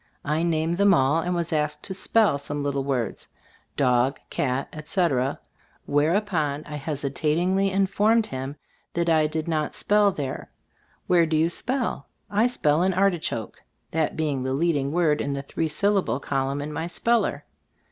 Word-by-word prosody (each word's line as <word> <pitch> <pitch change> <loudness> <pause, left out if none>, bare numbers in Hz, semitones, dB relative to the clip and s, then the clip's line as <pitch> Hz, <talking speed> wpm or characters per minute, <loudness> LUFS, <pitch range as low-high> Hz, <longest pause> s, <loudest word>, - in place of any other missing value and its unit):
I 150 +2 0
named 165 0 0
them 200 -1 +6
all, 135 +3 +3
and 180 +1 -1
was 170 -1 -2
asked 150 -1 -1
to 190 - -5
spell 200 -5 +2
some 145 +1 -4
little 140 -1 -1
words, 130 -4 -2 0.5
"dog," 125 0 +2
"cat," 130 0 -1
etc., 150 -4 0 0.5
whereupon 155 -1 +1
I 150 0 -6
hesitatingly 155 +6 0
informed 205 +4 +2
him 135 -3 -5 0.4
that 170 0 +1
I 155 -1 +4
did 155 +1 -3
"not 155 -2 -1
spell 205 -1 +3
there." 140 -7 -5 0.6
"Where 170 -2 +4
do 155 0 +1
you 165 +2 +2
spell?" 245 - -2 0.2
"I 210 +4 +3
spell 155 -11 +1
in 185 0 +2
'Artichoke/" 175 - -1 0.3
that 160 0 -1
being 150 -4 -1
the 130 +1 -2
leading 145 -2 +1
word 160 -3 +2
in 140 - -2
the 140 0 -4
three 160 +3 -2
syllable 195 -1 +1
col 135 -1 -1
umn 140 +1 -3
in 150 +1 -6
my 160 +3 -3
speller. 195 -5 0
155 Hz, 160 wpm, -25 LUFS, 140-180 Hz, 0.6 s, them